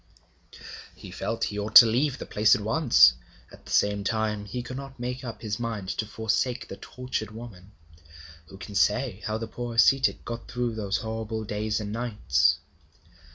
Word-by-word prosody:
He - - -11
felt 115 - -3
he 105 - -2
ought 105 +2 -5
to 115 - +12
leave 125 +5 +1
the - - -7
place 105 +1 +4
at - - -4
once; 115 - +5 0.4
at - - -16
the - - -10
same 100 0 +2
time 105 0 -1
he 125 +4 -5
could 130 - -7
not 135 -1 -9
make 125 +2 -4
up 115 -3 -8
his 105 0 -3
mind 110 -5 -4
to 110 - -3
forsake 110 +3 -1
the 95 - -8
tortured 125 -4 -5
woman. 105 -3 -11 0.7
Who 95 - -13
can 100 +1 -9
say 105 +2 +1
how 110 0 -1
the 115 - -4
poor 120 +1 -6
ascetic 135 +3 +3
got 115 0 -6
through 125 -1 -2
those 105 -2 -2
terrible 110 0 -4
days 105 +1 -2
and 105 -1 -5
nights? 105 - +1
110 Hz, 180 wpm, -26 LUFS, 105-120 Hz, 0.7 s, to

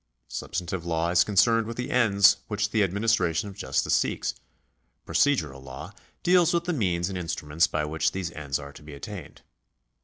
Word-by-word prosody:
Substantive 90 0 -4
law 85 0 0
is 85 -1 +5
concerned 110 +3 +3
with 115 - -6
the 125 - -3
ends 100 -6 +5
which 105 0 -1
the 110 - +2
administration 100 -1 +1
of 100 - -11
justice - - -1
seeks; - - 0 0.7
procedural 75 - +1
law 65 0 -9 0.3
deals 175 -1 +4
with 170 - +1
the 175 +1 -1
means 90 - 0
and 95 -2 -4
instruments 80 -1 0
by 75 -1 -1
which 80 +1 0
those 95 -3 -4
ends 75 -4 -3
are 70 -1 -9
to - - -13
be 75 -1 -10
attained. 70 - -9
90 Hz, 175 wpm, -26 LUFS, 80-110 Hz, 0.7 s, is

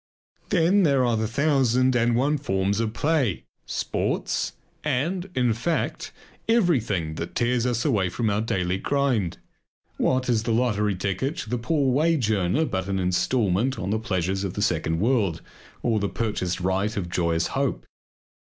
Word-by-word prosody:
Then 180 +3 +3
there 140 -7 +3
are 120 -1 +2
the 110 0 0
thousand 130 -1 +2
and 120 0 +2
one 140 +4 +1
forms 100 -5 0
of 115 -1 0
play; 140 - 0 0.2
sports - - -1 0.3
and 165 +7 -1
in 125 -3 +2
fact 130 +9 -2 0.4
everything 120 - +2
that 85 - -5
tears 120 0 +1
us 120 +1 -1
away 105 -11 +2
from 115 +6 -2
our 105 0 +1
daily 95 -4 -1
grind. 125 -12 0 0.6
What 130 0 +1
is 120 -3 +2
the 115 0 -1
lottery 105 -4 +1
ticket 100 - -2
to 110 - -6
the 125 - 0
poor 140 +1 +1
wage 150 -5 +2
earner 105 - +1
but 95 -7 -3
an 95 - 0
instalment 100 +5 +1
on 95 +2 -3
the 110 - +1
pleasures 95 -3 -1
of 95 -3 -4
the 105 - -1
second 80 -4 0
world, 105 -7 +1 0.4
or 115 -3 +2
the 100 -1 -1
purchased 100 -6 -2
right 95 +4 0
of 90 -3 -2
joyous 85 -2 0
hope? - - -1
115 Hz, 160 wpm, -25 LUFS, 95-130 Hz, 0.6 s, Then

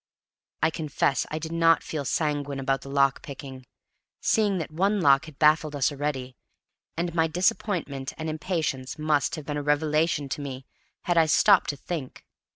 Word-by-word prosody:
I 160 - +4
confess 150 -4 0
I 155 - -3
did 160 +1 -5
not 165 0 +3
feel 150 -3 -4
sanguine 145 -2 -1
about 135 0 0
the 135 - -10
lock 140 0 +2
picking, 130 -2 -9 0.5
seeing 205 -3 +2
that 160 -3 -4
one 195 +6 +1
lock 140 -4 +4
had 155 -4 -13
baffled 155 0 +3
us 140 +1 +1
already; 135 -3 -3 0.6
and 170 0 -2
my 165 -1 +2
disappointment 165 -5 -1
and 160 - -4
impatience 155 -4 -3
must 150 -2 +1
have 155 -3 -8
been 145 -1 -3
a - - -2
revelation 150 0 +1
to 145 - -4
me 135 -2 -6 0.4
had 175 -1 +2
I 160 - +4
stopped 200 +4 +5
to 145 - -3
think. 150 -4 -6
150 Hz, 170 wpm, -26 LUFS, 140-165 Hz, 0.6 s, stopped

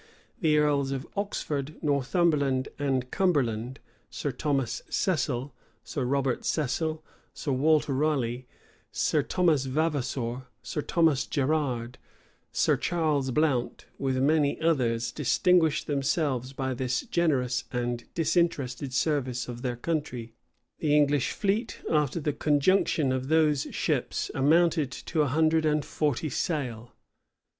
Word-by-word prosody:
The 155 -6 +3
earls 145 -2 +2
of 135 0 -3
Oxford, 155 -7 -3
Northumberland, 140 -2 +1
and 130 -3 -1
Cumberland, 130 - 0 0.3
Sir 145 - -3
Thomas 135 -2 -1
Cecil, 140 -6 -1 0.3
Sir 135 -4 -3
Robert 135 -1 0
Cecil, 155 +2 -1 0.3
Sir 145 - -3
Walter 150 +2 +2
Raleigh, 130 -4 0 0.4
Sir - - +1
Thomas 160 -7 +1
Vavasor, 130 -4 -2 0.2
Sir 150 - -3
Thomas 160 -4 +2
Gerrard, 130 -4 -1 0.5
Sir - - +2
Charles 155 -6 0
Blount, 130 -3 0
with 135 -1 0
many 145 +2 +2
others, 120 -8 +1
distinguished 160 +3 +2
themselves 140 -2 0
by 130 -1 -2
this 125 0 -1
generous 130 -8 0
and 120 -1 -2
disinterested 150 -6 0
service 130 -3 0
of 120 -1 -7
their 125 -2 -2
country. 125 -5 -3 0.5
The 150 -2 +2
English 145 -2 +3
fleet, 210 +2 -1
after 150 0 +1
the 150 -1 -1
conjunction 150 0 +2
of 130 0 -2
those 155 -2 +2
ships, - - -1
amounted 155 +1 +3
to 160 - -2
a 150 - +2
hundred 160 +3 +2
and 150 -1 +1
forty 150 0 -1
sail. 125 -6 -3
140 Hz, 120 wpm, -27 LUFS, 130-155 Hz, 0.5 s, The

